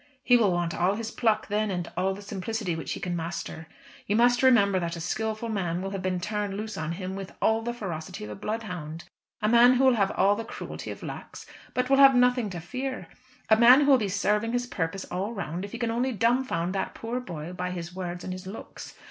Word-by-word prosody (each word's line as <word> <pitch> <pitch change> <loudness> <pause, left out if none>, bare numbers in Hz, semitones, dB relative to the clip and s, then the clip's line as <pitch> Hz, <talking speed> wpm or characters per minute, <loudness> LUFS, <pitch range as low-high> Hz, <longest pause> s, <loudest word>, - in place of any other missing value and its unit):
He 245 - +5
will 220 -5 +4
want 175 -1 -1
all 185 +3 +1
his 225 +1 -4
pluck 220 -2 +1
then, 210 +1 0
and 175 -3 -2
all 190 +2 0
the 205 - -10
simplicity 200 -1 -3
which 160 - -4
he - - -6
can 180 -1 -3
master. 165 -1 -5 0.4
You 205 - +1
must 240 +2 +4
remember 200 -7 +5
that 170 -1 -3
a - - -6
skilful 220 +6 -2
man 180 -5 -1
will 195 +1 -4
have 195 -1 -4
been 185 -1 -1
turned 205 +1 -3
loose 215 +1 -5
on 160 +1 -3
him 185 +1 -5
with 195 -1 -7
all 220 0 +2
the 240 +1 -2
ferocity 175 - -6
of 105 - -6
a - - -6
bloodhound; 175 - -5 0.4
a - - +3
man 240 +3 +7
who 255 - +3
will 260 -1 +6
have 200 -4 +2
all 200 +1 +4
the 225 - -4
cruelty - - -7
of - - -7
Lax, - - -8 0.3
but 250 0 +1
will 270 +1 +4
have 275 -1 +8
nothing 250 -3 +3
to 180 -2 -5
fear; 255 +9 -5 0.4
a 220 - +6
man 240 +5 +8
who 285 0 +4
will 265 - +6
be 205 -3 -1
serving 210 +3 +1
his 245 0 0
purpose 190 -4 -3
all 195 +5 -2
round 175 -2 -4
if 200 - -7
he 235 - -5
can 235 -1 -1
only 245 +3 0
dumbfound 230 -6 +1
that 195 - -3
poor 235 +2 -3
boy 170 -7 -7
by 180 0 -3
his 175 -1 -6
words 180 -1 -5
and 185 - -4
his 185 0 -8
looks. 195 - -9
205 Hz, 240 wpm, -27 LUFS, 180-235 Hz, 0.4 s, have